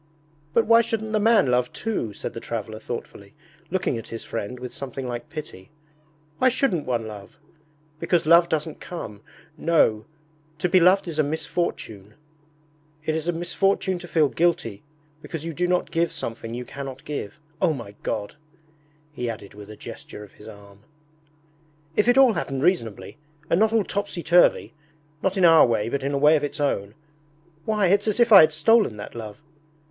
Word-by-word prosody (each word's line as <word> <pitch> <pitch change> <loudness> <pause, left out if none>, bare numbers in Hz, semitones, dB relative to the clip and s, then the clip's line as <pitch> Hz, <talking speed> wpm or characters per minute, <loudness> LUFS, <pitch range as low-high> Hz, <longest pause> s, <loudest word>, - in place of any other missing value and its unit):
'But 230 - +4
why 230 +1 +6
shouldn't 220 -1 -3
the 215 - +1
man 220 -3 +4
love 125 0 +1
too?' 215 - -3
said 100 - -6
the - - -6
traveller 110 -2 -5
thoughtfully, 105 -2 -8 0.3
looking 175 -9 -1
at - - -10
his 115 - -7
friend 115 +3 -5
with 125 0 -7
something 135 -1 -6
like 120 -1 -6
pity. 150 -12 -9 0.7
'Why 255 - +5
shouldn't 235 - 0
one 120 -3 -1
love? 105 -2 -10 0.6
Because 170 0 +1
love 170 +2 +6
doesn't 155 0 -2
come... 105 - -8 0.4
No, 115 -10 +2 0.5
to 165 - 0
be 185 +1 +4
beloved 185 +2 +4
is 160 -2 -4
a - - +5
misfortune. 150 - -4 0.9
It 155 - 0
is 160 +1 -3
a - - +3
misfortune 185 +2 0
to 175 - -10
feel 160 -3 +3
guilty 140 - 0 0.4
because 165 0 -6
you 165 - -4
do 180 +4 0
not 180 0 0
give 170 0 +1
something 115 -6 -6
you 125 0 -5
cannot 135 0 -8
give. 145 -4 -5 0.2
O - - +4
my 120 -9 -6
God!' 105 +6 -4 0.8
he 125 -4 -3
added, 105 -3 -8
with 105 0 -12
a 110 - -10
gesture 105 - -10
of 105 - -15
his 105 - -15
arm. 100 -2 -13 1.2
'If 210 - +2
it 245 +1 +4
all 265 -4 +7
happened 135 -7 -3
reasonably, 115 - -1 0.3
and 170 - +4
not 220 0 +3
all 225 -2 +2
topsy 200 -3 -3
turvy 175 0 +4 0.5
not 190 +1 0
in 185 - +4
our 165 -4 +7
way 115 -2 0
but 140 +3 -2
in 140 +1 -2
a - - +1
way 150 +3 +5
of 150 - 0
its 145 - -4
own! 105 -8 -1 0.7
Why, 210 -2 +1
it's 200 +3 +2
as 215 +2 0
if 235 -1 +4
I 200 - +11
had 155 - +5
stolen 160 - +3
that 105 - -8
love! 110 +4 -9
155 Hz, 185 wpm, -24 LUFS, 115-180 Hz, 1.2 s, I